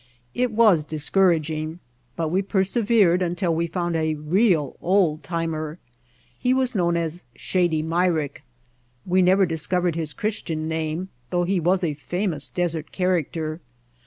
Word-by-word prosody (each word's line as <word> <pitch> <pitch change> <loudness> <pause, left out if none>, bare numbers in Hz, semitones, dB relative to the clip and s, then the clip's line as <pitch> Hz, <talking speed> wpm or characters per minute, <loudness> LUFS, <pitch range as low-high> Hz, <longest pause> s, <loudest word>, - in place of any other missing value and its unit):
It 250 0 +1
was 210 -8 +4
discouraging, 155 0 +1 0.4
but 165 -2 -1
we 185 +4 +1
persevered 195 -1 +2
until 175 0 0
we 165 +1 0
found 175 0 -2
a 155 -1 0
real 155 - +1
old 175 -4 +2
timer. 160 -1 -3 0.6
He 250 +1 +2
was 260 -1 0
known 175 -4 +1
as 165 +1 -3
Shady 175 -4 0
Myrick. 165 -3 0 0.6
We 185 +1 +3
never 190 +2 +5
discovered 175 +1 0
his 160 -2 -3
Christian 165 -7 -3
name 160 +3 -2 0.2
though 175 +4 +1
he 185 +1 +1
was 180 +3 +1
a 160 -3 0
famous 170 0 -3
desert 170 -3 -2
character. 165 -3 -1
170 Hz, 135 wpm, -23 LUFS, 155-185 Hz, 0.6 s, never